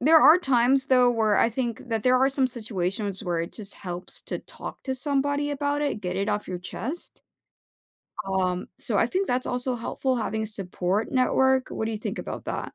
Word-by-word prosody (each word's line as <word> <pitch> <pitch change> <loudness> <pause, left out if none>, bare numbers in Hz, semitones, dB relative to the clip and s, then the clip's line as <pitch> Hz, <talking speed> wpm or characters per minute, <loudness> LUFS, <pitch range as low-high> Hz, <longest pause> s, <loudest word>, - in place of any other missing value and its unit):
there 320 +5 +7
are 310 +6 +8
times, 265 -3 +3
though, 250 -2 +5
where 220 -3 +2
I 230 - +4
think 240 0 -3
that 225 -2 -1
there 255 0 +4
are 265 +1 +4
some 270 -1 +2
situations 205 -4 -2
where 175 -2 0
it 170 - -5
just 205 -3 -4
helps 180 -1 -5
to - - -4
talk - - -9
to 265 - -1
somebody 285 +1 0
about 290 +1 -1
it, 285 -7 -1
get 180 -1 -3
it 200 +2 -1
off 210 0 -1
your 180 - -3
chest, 255 - -6 1.1
um, 185 -2 0
so - - 0
I - - +3
think 385 +1 -1
that's 250 +1 0
also 250 +1 0
helpful 255 +2 -1
having 220 0 -2
a - - -2
support 195 0 -1
network, 265 0 +3
what 220 - -3
do 225 - -1
you 215 - -3
think - - -4
about - - -6
that? - - -3
240 Hz, 205 wpm, -26 LUFS, 200-265 Hz, 1.1 s, are